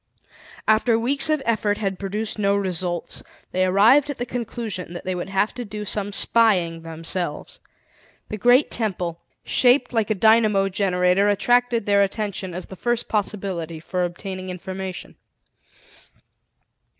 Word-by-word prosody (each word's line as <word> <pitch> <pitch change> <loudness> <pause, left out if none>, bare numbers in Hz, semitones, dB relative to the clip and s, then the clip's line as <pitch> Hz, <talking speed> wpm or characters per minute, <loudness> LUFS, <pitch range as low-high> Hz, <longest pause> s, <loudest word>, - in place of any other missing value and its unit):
After 225 +1 +3
weeks 275 +6 +2
of 305 -3 +1
effort 215 -3 +1
had 195 -3 -3
produced 210 +2 -4
no 200 -1 +2
results, 180 -3 -3 0.3
they 185 0 +1
arrived 230 +10 +5
at 285 - -4
the 245 - -3
conclusion 230 -7 -5
that 175 - -7
they 185 - -1
would 180 +1 -5
have 195 +2 0
to 245 - -5
do 210 -1 -7
some 205 0 -2
spying 190 -7 +2
themselves. 165 - -4 0.7
The 215 - -4
great 245 +6 +4
temple, 180 -6 -2 0.2
shaped 250 0 +3
like 225 -2 0
a 215 - +1
dynamo 215 -2 +4
generator 185 0 +2
attracted 240 +2 +2
their 200 -1 +3
attention 200 -2 -2
as 180 - -5
the 190 - -11
first 240 +4 -1
possibility 190 -6 -3
for 180 +3 -2
obtaining 185 +2 -5
information. 185 +1 -7
200 Hz, 140 wpm, -22 LUFS, 185-225 Hz, 0.7 s, arrived